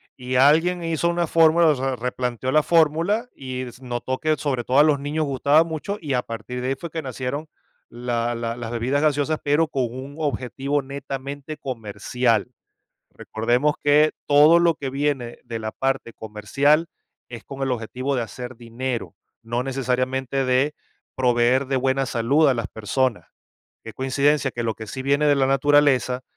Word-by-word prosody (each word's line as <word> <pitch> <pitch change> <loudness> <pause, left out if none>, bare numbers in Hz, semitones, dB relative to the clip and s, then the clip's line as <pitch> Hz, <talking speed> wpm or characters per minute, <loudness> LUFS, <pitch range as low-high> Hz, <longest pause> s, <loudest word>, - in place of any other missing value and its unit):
Y 125 0 -5
alguien 165 +7 +4
hizo 165 0 0
una 170 0 0
fórmula, 165 0 +4
o 150 - +4
sea, 135 0 -2
replanteó 125 +1 -3
la 155 - +5
fórmula 170 +9 +2
y 130 -1 -5
es 125 0 -10
notó 125 +1 -3
que 155 0 +1
sobre 130 -5 -2
todo 130 +3 0
a - - +8
los 150 -2 +3
niños 150 +2 -2
gustaba 140 +3 +3
mucho, 165 +5 -4
y 145 -4 -3
a 125 - +2
partir 115 +2 -6
de 125 - -2
ahí 135 - 0
fue 170 - -7
que 160 0 -3
nacieron 130 +3 -4 0.4
la 120 0 -2
la 115 0 -3
las 115 -1 -6
bebidas 125 +5 0
gaseosas, 150 0 +1
pero 150 +2 +2
con 135 -3 -1
un 130 +3 -8
objetivo 140 -1 -1
netamente 140 +2 -6
comercial. 115 -1 -1 0.6
Recordemos 120 +7 0
que 150 +1 +5
todo 150 +4 +6
lo 170 -1 +3
que 140 -2 -4
viene 135 -3 -2
de 115 -2 -5
la 110 0 -4
parte 135 -3 -2
comercial 140 +10 +1 0.4
es 115 -2 -9
con 135 0 -9
el 135 -1 0
objetivo 125 +3 -3
de 125 - 0
hacer 125 +2 -7
dinero, 120 +1 -5 0.3
no 120 +2 -2
necesariamente 130 0 -1
de 130 +4 +2 0.4
proveer 125 +1 +2
de 135 - 0
buena 135 +1 +1
salud 130 +6 +2
a 135 - +4
las 115 -3 -3
personas. 115 +2 -1 0.6
¿Qué 115 - -9
coincidencia 140 +1 +1
que 120 -1 -4
lo 115 -1 -1
que 110 - -8
sí 130 +6 -5
viene 140 +2 +2
de 145 - +5
la 135 -1 +2
naturaleza, 135 -2 +3
135 Hz, 175 wpm, -23 LUFS, 125-145 Hz, 0.6 s, a